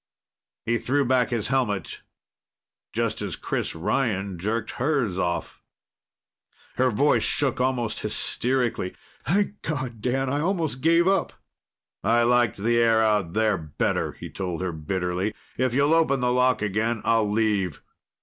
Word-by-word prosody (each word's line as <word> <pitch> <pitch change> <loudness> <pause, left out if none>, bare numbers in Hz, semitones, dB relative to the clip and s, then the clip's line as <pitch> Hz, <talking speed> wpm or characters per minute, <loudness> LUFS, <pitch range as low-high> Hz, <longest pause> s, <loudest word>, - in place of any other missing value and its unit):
He 115 0 +1
threw 140 +2 +1
back 125 -1 +2
his 115 -4 -2
helmet 110 -9 -1 0.9
just - - -1
as - - -3
Chris - - -3
Ryan 100 0 -1
jerked 110 +4 -2
hers 125 - 0
off. 85 -1 -2 1.2
Her 130 0 +3
voice 140 +6 +3
shook 135 -3 +1
almost 125 -3 0
hysterically. 125 -7 -1 0.3
"Thank 205 +4 +1
God. 130 -7 -4
Dan, 130 +3 0
I 140 +3 0
almost 160 -7 -1
gave 165 +3 +4
up!" 195 -2 +1 0.7
"I 115 +3 +3
liked 120 -1 +3
the 115 +4 +1
air 115 -1 +4
out 105 -6 +1
there 110 -3 +2
better," 75 -2 -1
he - - -9
told 90 -4 -4
her 95 -1 -1
bitterly. 90 +5 -2 0.2
"If 130 -1 0
you'll 145 +3 +3
open 160 -5 +3
the 125 0 +1
lock 125 -3 +2
again, 110 +2 0
I'll 115 -2 +3
leave. 105 -7 0
120 Hz, 140 wpm, -25 LUFS, 105-130 Hz, 1.2 s, gave